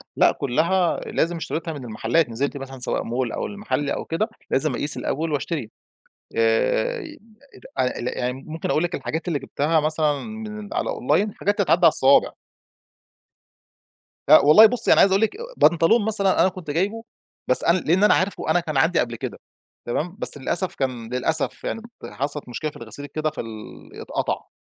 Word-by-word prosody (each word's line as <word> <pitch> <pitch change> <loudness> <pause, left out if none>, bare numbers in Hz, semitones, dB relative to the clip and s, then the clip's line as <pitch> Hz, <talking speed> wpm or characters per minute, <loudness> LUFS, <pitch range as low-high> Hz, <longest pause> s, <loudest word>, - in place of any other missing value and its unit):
لأ - - +5
كلها 165 +7 +1
لازم 170 +2 -1
اشتريتها، 165 0 -4
من 140 -4 -8
المحلات 120 +6 0
نزلت 140 +5 -2
مثلًا، 135 -1 -8
سواء 125 - -2
Mall 120 0 -2
أو - - -3
المحل، 205 -8 -3
أو - - -3
كده، 205 +7 -1 0.2
لازم 145 +1 +1
أقيس 145 +4 -1
الأول 160 +3 -2
وأشتري. 145 -5 -3 0.7
آآ، 460 - +1 0.8
لا 125 0 0
أ 125 - -4
يعني 125 0 -1
ممكن 160 +1 -4
أقول 155 - +2
لِك 175 - -3
الحاجات 160 +3 -4
اللي 160 -4 0
جبتها 150 +4 0
مثلًا 155 -1 +1
من 215 -2 -7
على - - -1
Online 180 +11 0
حاجات 205 +1 0
تتعدّ 190 -3 +3
على - - +10
الصوابع. 140 -3 +4 2.0
لا - - +10
والله 155 +10 +8
بُصِّي، 245 +2 +3
أنا - - +3
عايز 195 - +5
أقول 195 +2 +3
لِك 220 - 0 0.2
بنطلون 190 +7 +4
مثلًا 200 -3 +2
أنا 185 - +4
كنت 180 -5 -7
جايبه، 200 +8 -1 0.4
بس 130 - +3
أنا 170 +2 +4
لأن 180 +2 +1
أنا 210 - +6
عارفه 190 -3 -1
أنا 175 - +3
كان 155 -4 -4
عندي 165 +5 +3
قبل 120 -1 -1
كده، - - -6 0.5
تمام؟ 165 +9 -3
بس - - 0
للأسف 175 +7 -1
كان 125 -3 -4
للأسف 150 +5 +2
يعني، 225 - -3 0.2
حصلت 145 0 -5
مشكلة 150 +6 -4
في - - -14
الغسيل، 115 +5 -9
كده 155 +2 -2
في 155 - -6
ال 110 -2 -10
اتقطَّع. - - -3
155 Hz, 175 wpm, -23 LUFS, 135-185 Hz, 2.0 s, على